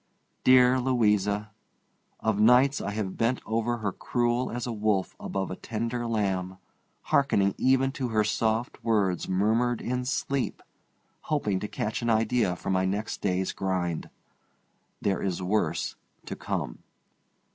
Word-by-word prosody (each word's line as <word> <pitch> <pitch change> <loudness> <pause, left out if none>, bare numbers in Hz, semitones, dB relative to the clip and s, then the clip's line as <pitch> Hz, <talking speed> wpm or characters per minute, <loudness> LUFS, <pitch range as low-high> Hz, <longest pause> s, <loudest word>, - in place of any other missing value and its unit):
Dear 130 0 +6
Louisa! 105 -4 +1 0.7
Of 110 -2 0
nights 125 +5 +5
I 100 - -3
have 105 -2 -3
bent 120 +2 +1
over 115 +2 0
her 105 -3 -2
cruel 120 +4 0
as 120 +1 -3
a 120 - -3
wolf 105 -3 0
above 95 -1 -3
a - - -3
tender 115 +3 -3
lamb, 95 -4 -1 0.6
hearkening 100 -8 +3
even 135 +1 +3
to 135 -2 -3
her 110 -2 +2
soft 110 +2 -1
words 100 -6 +1
murmured 110 +6 +2
in 125 +1 -2
sleep, 135 +1 -2 0.7
hoping 105 -11 +1
to 105 - -4
catch 105 +2 -3
an 120 - -1
idea 110 -3 +2
for 95 - -4
my 95 0 +2
next 100 +3 -2
day's 95 -1 0
grind. 90 -4 -2 0.9
There 100 -1 +1
is 95 -2 -1
worse 90 -3 0 0.3
to - - -5
come. - - -4
110 Hz, 140 wpm, -27 LUFS, 95-120 Hz, 0.9 s, Dear